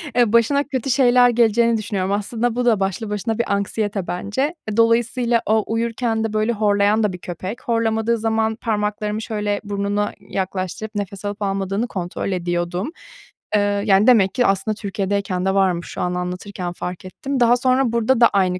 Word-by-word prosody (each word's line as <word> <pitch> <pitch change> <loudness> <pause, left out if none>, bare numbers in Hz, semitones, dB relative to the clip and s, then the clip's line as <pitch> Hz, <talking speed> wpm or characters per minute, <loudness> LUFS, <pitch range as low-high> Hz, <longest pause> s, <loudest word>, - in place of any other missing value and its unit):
eee, 240 -3 +3
başına 260 +5 +4
kötü 270 -3 -3
şeyler 250 -1 +5
geleceğini 235 0 +3
düşünüyorum. 200 -3 -2
Aslında 225 +3 -1
bu 245 0 0
da 225 -4 +3
başlı 195 +3 -2
başına 215 +2 -2
bir 235 - 0
anksiyete 200 -1 -2
bence. 205 - -2
E, 215 0 -3
dolayısıyla 235 +1 +2
o 220 0 +2
uyurken 230 0 -1
de 225 -1 -2
böyle 215 +2 +1
horlayan 205 0 +2
da 205 - 0
bir - - -6
köpek. 185 +6 -6
Horlamadığı 230 0 +1
zaman 220 0 0
parmaklarımı 210 -1 -2
şöyle 210 -2 -2
burnuna 205 0 -1
yaklaştırıp 195 +2 -4
nefes 200 0 -5
alıp 205 +1 -4
almadığını 195 +3 -1
kontrol 180 0 -4
ediyordum. 175 - -2 0.6
Eee, 210 - +4 0.2
yani, 200 0 +4
demek 210 -7 +5
ki 250 -1 +2
aslında 195 +2 +1
Türkiye’deyken 195 -2 -2
de 190 - +2
varmış, 185 -3 +1
şu - - -6
an 180 0 -1
anlatırken 180 0 -4
fark 180 +1 -6
ettim. 270 +8 -4
Daha 240 0 +5
sonra 255 0 +2
burada 235 +2 +1
da 235 - +9
aynı 185 -3 +1
210 Hz, 170 wpm, -21 LUFS, 195-230 Hz, 0.6 s, da